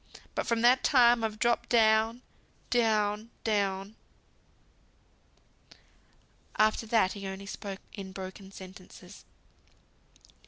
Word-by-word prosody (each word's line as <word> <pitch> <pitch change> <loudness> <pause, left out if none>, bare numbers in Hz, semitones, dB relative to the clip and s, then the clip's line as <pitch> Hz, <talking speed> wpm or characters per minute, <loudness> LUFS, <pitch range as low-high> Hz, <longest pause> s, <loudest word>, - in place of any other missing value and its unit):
But - - -3
from 235 -1 +1
that 250 +2 +5
time 240 -3 +5
I've 215 -1 -2
dropped 235 +2 0
down, 225 +1 +3 0.5
down, 215 -2 +1
down." 200 -1 -1 2.6
After 215 +1 +2
that 215 -4 +2
he 200 -1 -7
only 190 +1 -7
spoke 195 -1 -7
in 195 -2 -8
broken 190 0 -9
sentences. 185 0 -13
215 Hz, 95 wpm, -29 LUFS, 195-230 Hz, 2.6 s, that